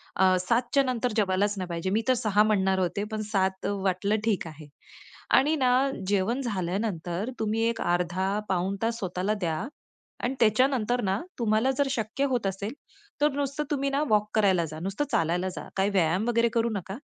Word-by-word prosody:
अ, 185 0 +4
7:00 230 +6 +2
च्या 275 - +5
नंतर 250 -2 -1
जेवायलाच 200 0 +1
नाही 185 -1 -3
पाहिजे. 170 +2 -2
मी 215 +3 +2
तर 260 - +5
6:00 210 -4 +2
म्हणणार 190 -3 +2
होते, 185 +2 -1
पण 215 0 -2
7:00 190 -1 0
वाटलं 195 0 0
ठीक 205 -6 0
आहे. 155 -1 -11 0.7
आणि 300 +4 +4
ना 260 -3 +2 0.4
जेवण 205 +6 +1
झाल्यानंतर 190 -2 -2
तुम्ही 220 0 0
एक 230 - -3
अर्धा 175 +1 0 0.2
पाऊण 190 +1 0
तास 230 +1 0
स्वतःला 185 +1 -1
द्या 165 -3 0 0.7
आणि 250 +2 0
त्याच्यानंतर 245 +1 +2
ना 195 +1 0 0.2
तुम्हाला 225 +3 +2
जर 285 - +2
शक्य 235 +3 -1
होत 245 -5 0
असेल, 200 +4 -4 0.5
तर 295 +1 +4
नुसतं 285 +1 -1
तुम्ही 275 -1 0
ना 280 +2 +1
वॉक 210 -1 +2
करायला 190 -5 +3
जा. 155 0 -8
नुसतं 195 - -2
चालायला 175 +3 +1
जा. - - -7
काही 195 +1 +2
व्यायाम 185 +2 +1
वगैरे 235 0 +3
करू 235 0 +2
नका. 195 +1 -5
205 Hz, 180 wpm, -27 LUFS, 185-235 Hz, 0.7 s, च्या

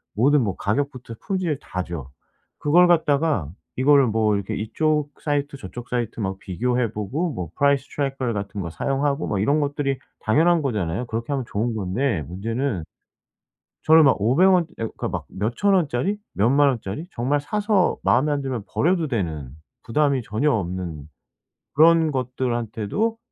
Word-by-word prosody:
모든 135 +5 +4
뭐 100 - -2
가격부터 130 +1 -3
품질 180 -7 -2
다죠. 85 -7 -5 0.5
그걸 175 +5 +5
갖다가 150 - +2 0.3
이거를 140 0 +5
뭐 110 -1 +2
이렇게 100 -1 -3
이쪽 150 +7 0
사이트 145 -1 -1
저쪽 120 +2 -9
사이트 120 -2 -2
막 95 -1 -3
비교해 120 +5 -1
보고 135 - -2
뭐 90 -8 -5
price 140 -1 +3
tracker 135 -4 -1
같은 100 -1 -4
거 85 - -4
사용하고 140 - -1
뭐 100 - -1
이런 140 +10 +2
것들이 140 -2 -1 0.2
당연한 165 +9 +3
거잖아요. 105 - -2
그렇게 115 +4 -3
하면 135 -2 -1
좋은 115 +3 -1
건데 105 - -1
문제는 110 - -3 1.0
저는 160 0 +7
막 135 - +4
500 135 - +4
원 180 -2 +4
예 115 - -1
그러니까 - - -5
막 - - -4
몇 110 +5 -3
1,000 200 -1 +3
원짜리 175 +3 0 0.2
몇 105 +4 +2
10,000 140 +2 +5
원짜리 125 - -4
정말 135 +5 0
사서 205 +4 +1
마음에 150 +4 +3
안 145 -1 0
들면 130 -5 -3
버려도 170 -1 +1
되는 80 - -3 0.3
부담이 140 +2 +1
전혀 125 +8 0
없는 90 - -3 0.7
그런 160 +1 +5
것들한테도 125 - -2
130 Hz, 335 characters per minute, -23 LUFS, 105-145 Hz, 1.0 s, 저는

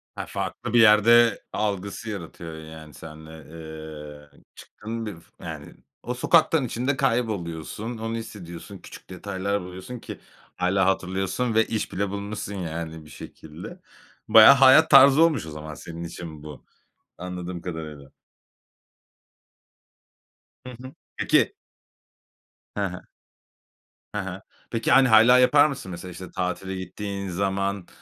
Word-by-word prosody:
Ha, - - -5
farklı - - -5
bir 120 - +5
yerde 115 +1 +6
algısı 100 +2 -3
yaratıyor 85 -4 -7
yani 80 -1 -11
seninle, 80 +1 -11 1.0
eee, - - -22
çıktın 115 +2 -7
bir, 105 -4 -6 0.3
yani, - - -8 0.3
o 125 - -3
sokaktan 155 +2 +3
içinde 130 +4 -2
kayboluyorsun. 110 - -2
Onu 115 +1 -4
hissediyorsun. 100 -4 -8
Küçük - - -14
detaylar 100 +2 -3
buluyorsun 90 +7 -8
ki. - - -9 0.4
Hâlâ 90 +1 +1
hatırlıyorsun 95 +5 -1
ve 110 0 +4
iş 110 - -3
bile 100 +1 -1
bulmuşsun, 100 0 -5
yani, 80 -3 -6
bir 75 - -15
şekilde. 80 +2 -11 0.5
Bayağı 110 +3 +9
hayat 135 +4 +7
tarzı 140 +4 +8
olmuş 160 - +2
o 80 - -8
zaman 75 0 -8
senin 85 +2 -8
için 80 -2 -8
bu, 75 -5 -11 0.5
anladığım 90 -1 -6
kadarıyla. 75 -5 -7 2.6
Hı - - -7
hı. 130 +1 -9 0.2
Peki - - +2 1.2
Hı 100 - +1
hı. 90 -1 -6 1.1
Hı 105 - 0
hı. 95 0 -7 0.3
Peki, 115 0 -1
hani, 135 +1 +6
hâlâ 115 +3 +7
yapar 145 +4 +6
mısın? 130 -10 -6
Mesela 90 +1 -8
işte 90 +1 -10
tatile 95 +1 -3
gittiğin 100 +2 -5
zaman, 95 0 -2
100 Hz, 125 wpm, -24 LUFS, 85-115 Hz, 2.6 s, Bayağı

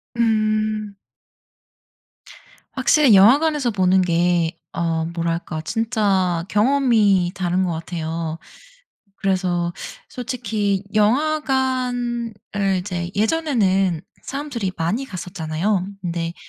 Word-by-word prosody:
음. 215 -2 0 1.8
확실히 295 -8 +4
영화관에서 270 +5 +5
보는 185 -1 +3
게 170 -1 +2 0.2
어 165 -1 -1
뭐랄까 170 -1 -3
진짜 195 -5 0
경험이 210 -6 +3
다른 185 0 0
것 180 - -1
같아요. 165 -1 -4 0.8
그래서 180 -3 0 0.4
솔직히 220 -6 -2
영화관을 250 -2 0 0.4
이제 180 -2 -4
예전에는 205 - +1 0.2
사람들이 270 -8 -4
많이 190 +12 -1
갔었잖아요. 185 -1 -2
근데 170 -1 -3
200 Hz, 205 characters per minute, -21 LUFS, 175-235 Hz, 1.8 s, 영화관에서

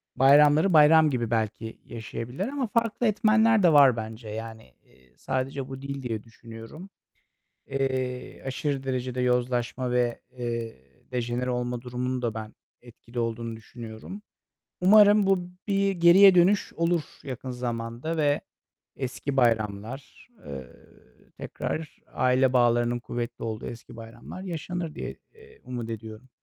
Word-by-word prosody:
bayramları 145 +6 +5
bayram 155 0 +7
gibi 120 -4 -2
belki 110 0 -2
yaşayabilirler 120 - -5
ama 270 -2 -2
farklı 230 +1 0
etmenler 220 0 +4
de 170 -3 +5
var 140 -4 +7
bence. 110 0 -6
Yani, 110 - -8
iii, 65 0 -26
sadece 130 0 -3
bu 135 0 -7
değil 140 -1 -6
diye 110 -3 -3
düşünüyorum. 115 - -11 0.8
Eee, 130 -2 -3
aşırı 135 +1 -2
derecede 130 -1 -3
yozlaşma 125 0 0
ve, 120 -1 0 0.2
eee, 115 -2 -3 0.4
dejenere 125 +1 -2
olma 125 0 -2
durumunun 125 +1 -3
da 115 -3 -1
ben 110 -1 -7 0.3
etkili 120 0 -12
olduğunu 115 0 -2
düşünüyorum. 115 - -10 0.6
Umarım 205 +2 +7
bu 185 -2 +1 0.2
bir 195 0 +2
geriye 185 +2 +7
dönüş 185 +3 +3
olur 170 -1 +1 0.2
yakın 130 -2 -6
zamanda 120 +5 -4
ve 145 -2 +2 0.5
eski 135 +1 -4
bayramlar, 115 - -1
ııı, 65 -2 -13
tekrar 155 -2 -5
aile 130 0 +3
bağlarının 120 -1 +3
kuvvetli 120 0 -5
olduğu 110 -1 -4
eski 120 -1 -10
bayramlar 115 +10 -10
yaşanır 170 -2 -4
diye, - - -5 0.2
eee, 445 0 -18
umut 120 -2 -5
ediyorum. 110 +2 -8
125 Hz, 125 wpm, -26 LUFS, 115-160 Hz, 0.8 s, bayram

